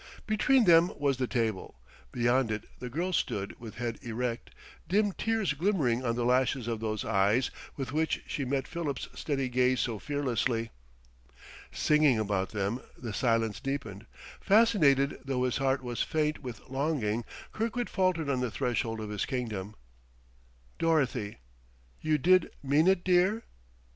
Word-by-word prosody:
Between 235 +4 +3
them 170 0 +6
was 140 -2 +1
the 130 -1 -1
table. 110 - -2 0.3
Beyond 120 0 +2
it 110 - -3 0.2
the 125 +1 -5
girl 175 +8 -2
stood 100 - -1
with 115 -2 -9
head 120 -1 -4
erect, 120 0 -3 0.4
dim 205 +2 +3
tears 220 -5 0
glimmering 145 - +1
on 115 -2 0
the 120 0 -1
lashes 125 -1 +2
of 115 -2 -2
those 110 -1 -3
eyes 100 +6 +2 0.3
with 135 -2 -4
which 160 +2 0
she 145 - -3
met 135 +1 -1
Philip's 155 -6 -4
steady 135 -3 -2
gaze 125 +1 +2
so 110 -3 -1
fearlessly. 120 -5 -1 1.0
Singing 150 -5 +3
about 100 -3 0
them, 105 +4 -2 0.2
the 115 -4 -6
silence 115 -2 +1
deepened. 115 -7 -5 0.3
Fascinated, 190 - +4
though 135 -2 -1
his 125 -1 0
heart 135 0 +1
was 120 -1 -3
faint 155 -1 0
with 125 -4 -8
longing, 135 -5 -1 0.3
Kirkwood 230 +2 -2
faltered 185 -5 0
on 135 -2 0
the 125 -1 -1
threshold 115 -1 -1
of 105 -1 -5
his 105 - -2
kingdom. 110 -6 -4 1.0
"Dorothy!... 135 -10 +1 0.6
You 155 -1 +2
did 185 +4 +4
mean 145 +5 +3
it, 190 -2 +3
dear?" 185 +5 +3
130 Hz, 150 wpm, -29 LUFS, 115-155 Hz, 1.0 s, them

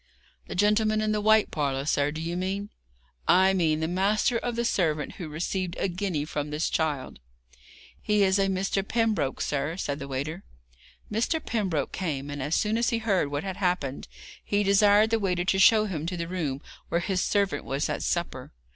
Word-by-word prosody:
'The - - -6
gentleman 215 +2 +3
in 215 0 0
the 210 0 0
white 220 0 +4
parlour, 140 -3 -1
sir, 145 -1 +1
do 155 +2 -5
you 165 +2 -3
mean?' 195 +3 -3 0.6
'I 190 +1 +5
mean 160 -4 +1
the 160 - 0
master 205 +6 +1
of 240 0 -3
the 235 0 -1
servant 155 -9 0
who 170 -5 -6
received 175 +3 -3
a - - 0
guinea 175 -5 -2
from 150 -1 -4
this 150 +2 -1
child.' 150 - -2 0.8
'He 210 -1 +2
is 190 +1 +3
a 195 - +3
Mr. 195 +1 0
Pembroke, 220 - 0
sir,' 145 +4 -1
said 145 -6 -3
the 140 - -6
waiter. 145 +7 -4 0.7
Mr. 230 +9 0
Pembroke 190 - -2
came, 145 -6 -3
and 145 -1 -5
as 150 +4 0
soon 220 +2 +1
as 235 - +2
he 235 - 0
heard 200 -8 +1
what 145 +2 -3
had 190 -1 -4
happened 180 -8 -1 0.4
he 205 0 +1
desired 205 +2 +5
the 225 - +2
waiter 180 -3 0
to 190 0 +2
show 215 +1 +6
him 165 -6 -4
to 180 0 -3
the 170 0 -3
room 155 -7 -3 0.3
where 170 - +1
his 185 0 0
servant 200 -2 0
was 140 +2 -1
at - - -3
supper. 170 -7 -2
185 Hz, 195 wpm, -27 LUFS, 155-205 Hz, 0.8 s, show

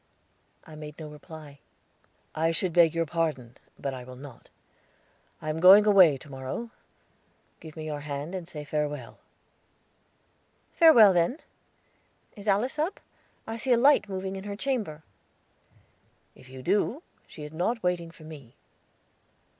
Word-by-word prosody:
I 155 - -13
made 150 -1 -9
no 155 - -8
reply. 150 -1 -12 0.7
"I 160 +1 +1
should 170 +1 -1
beg 170 -2 +5
your 165 0 +1
pardon, 150 -7 -2 0.2
but 140 - -4
I 130 -1 -7
will 125 +1 -11
not. 130 -2 -13 0.9
I 155 - -3
am 155 - -4
going 195 +4 +8
away 185 -9 +6
to 145 - -14
morrow. 135 - -6 0.9
Give 160 -2 -12
me 155 -1 -7
your 150 -1 -4
hand, 145 +3 -5
and 180 -3 -5
say 150 -3 -7
farewell." 145 -7 -4 1.5
"Farewell 235 - +7
then. 175 - +1 1.0
Is 205 -1 -11
Alice 230 +9 +1
up? 320 +6 -1 0.5
I 225 +1 -5
see 250 +2 +1
a - - +4
light 265 -4 +4
moving 190 0 -4
in 190 +1 -7
her 200 -1 -5
chamber." 210 - -3 1.3
"If 130 - -18
you 130 0 -10
do, 210 - 0 0.2
she 155 - -11
is 150 +1 -9
not 220 +8 -1
waiting 175 -2 -1
for 165 -1 -16
me." 145 -7 -12
165 Hz, 145 wpm, -27 LUFS, 150-200 Hz, 1.5 s, going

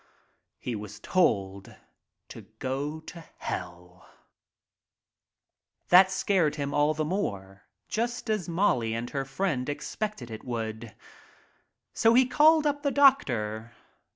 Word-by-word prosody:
He 120 - -5
was 105 0 -8
told 100 - 0 0.5
to - - -10 0.2
go 140 +4 -3
to 165 +1 -11
Hell! 90 +1 -7 1.8
That 185 +1 +7
scared 190 -5 +1
him 140 -2 -3
all 150 +1 +2
the 155 0 -1
more, 100 - -4 0.2
just 240 +2 -3
as 210 -6 -1
Molly 130 - +1
and 115 +1 -5
her 135 -1 -2
friend 135 -2 -2
expected 145 - -5
it 110 - -8
would. 115 -2 -5 1.0
So 225 +1 +4
he 255 +1 +6
called 310 +4 +4
up 290 -1 0
the 285 - +1
doctor. 120 - +2
145 Hz, 120 wpm, -27 LUFS, -, 1.8 s, That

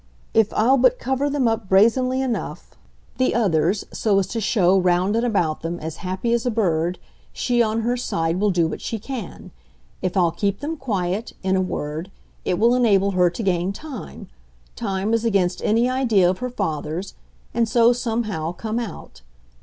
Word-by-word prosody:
If 220 -2 +3
I'll 255 +5 +4
but 255 0 +4
cover 265 +3 -1
them 280 -4 +1
up 225 -3 -1
brazenly 255 +6 +3
enough, 250 -3 -4 0.4
the 255 - +2
others, 195 -3 +1
so 210 -3 +1
as 195 - +2
to 230 - -3
show, 190 -3 +3
round 185 +2 +2
and 230 - +1
about 175 -10 0
them, 170 +1 -4
as 160 0 -6
happy 190 +5 -2
as 235 -1 +1
a 250 - 0
bird, 180 -6 0 0.3
she 240 -1 +1
on 225 0 +1
her 240 +2 0
side 165 -8 -1
will 210 +1 +2
do 175 -3 +2
what - - -6
she 225 - -3
can. 225 -2 -7 0.5
If 185 +1 -2
I'll 175 -3 +3
keep 200 +3 -1
them 310 +3 -3
quiet, 205 - -2
in 190 0 +1
a 190 - +2
word, 160 -1 -4 0.4
it 180 - 0
will 230 +4 +4
enable 200 -6 +3
her 180 -2 +3
to 175 +7 -6
gain 185 0 0
time 275 0 -9 0.5
time 200 -1 -2
as 230 0 +1
against 195 -6 +1
any 230 +3 +3
idea 240 -8 +3
of 180 +1 0
her 250 0 -3
father's 175 -4 -3 0.4
and 230 -1 +1
so, 235 +1 +5
somehow, 220 -9 -2
come 220 +5 -3
out. 230 - -8
210 Hz, 185 wpm, -22 LUFS, 180-235 Hz, 0.5 s, so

